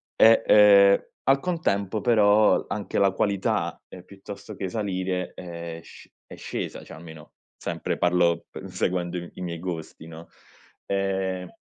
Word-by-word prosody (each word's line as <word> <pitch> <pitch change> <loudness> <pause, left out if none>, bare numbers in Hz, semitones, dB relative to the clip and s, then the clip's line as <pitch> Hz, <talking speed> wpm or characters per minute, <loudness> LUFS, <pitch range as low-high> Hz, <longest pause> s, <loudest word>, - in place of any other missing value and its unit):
e, 115 +1 +6
ehm, 100 -1 +6 0.2
al 135 0 +4
contempo 110 - -1
però 105 -2 +4
anche 100 -3 -4
la 100 -1 +4
qualità, 100 0 -1
ehm, 90 - -11
piuttosto 100 +2 -10
che 95 -1 -4
salire 95 -3 -3
è 85 -2 -8
sc - - -15 0.2
è - - -12
scesa, - - -6
cioè - - -12
almeno, 80 -2 -13 0.2
sempre - - -4
parlo 85 -1 +2
p - - -10
seguendo 90 -1 -2
i 85 0 -7
i - - -9
miei 85 -2 -5
gusti, 80 -2 -7
no? 80 +1 -11 0.6
Ehm 95 -2 -2
95 Hz, 145 wpm, -25 LUFS, 85-100 Hz, 0.6 s, e